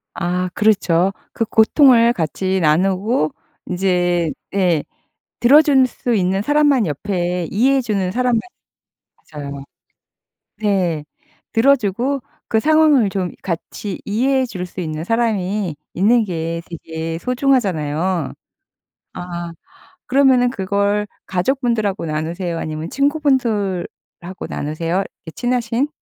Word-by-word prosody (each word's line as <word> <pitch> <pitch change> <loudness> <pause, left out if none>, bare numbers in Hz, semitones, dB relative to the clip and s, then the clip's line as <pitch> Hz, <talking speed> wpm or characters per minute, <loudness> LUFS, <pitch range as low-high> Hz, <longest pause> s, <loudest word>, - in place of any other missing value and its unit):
아. 180 +1 -1
그렇죠. 195 -3 +2 0.2
그 230 - -1
고통을 235 +1 +5
같이 185 +2 -1
나누고 185 - +1 0.3
인제 175 -3 +1 0.2
예. 175 -6 +2 0.6
들어줄 275 0 +6
수 245 -1 -2
있는 190 0 +1
사람만 290 -5 +3
옆에 175 +2 -2
이해해 265 +6 +3
주는 200 -6 -1
사람만 250 -1 +1 0.9
맞아요. 140 -2 -7 0.9
네. 180 -8 0 0.5
들어주고 250 +1 +2 0.3
그 220 - +3
상황을 305 -6 +4
좀 185 -2 -2
같이 190 +2 -5
이해해 260 +5 +1
줄 185 -6 -5
수 180 +1 -7
있는 155 -1 -4
사람이 210 -6 0 0.2
있는 225 +5 +3
게 165 -2 -3
되게 165 0 -5
소중하잖아요. 185 - 0 0.8
아. 175 -1 -6 0.6
그러면은 255 -2 +4
그걸 200 -1 0 0.2
가족분들하고 215 -2 0
나누세요? 165 +3 -3
아니면 155 +1 -4
친구분들하고 230 - -1
나누세요, 165 +3 -3 0.3
이렇게 160 - -8
친하신? 245 +2 0
195 Hz, 245 characters per minute, -19 LUFS, 175-245 Hz, 0.9 s, 들어줄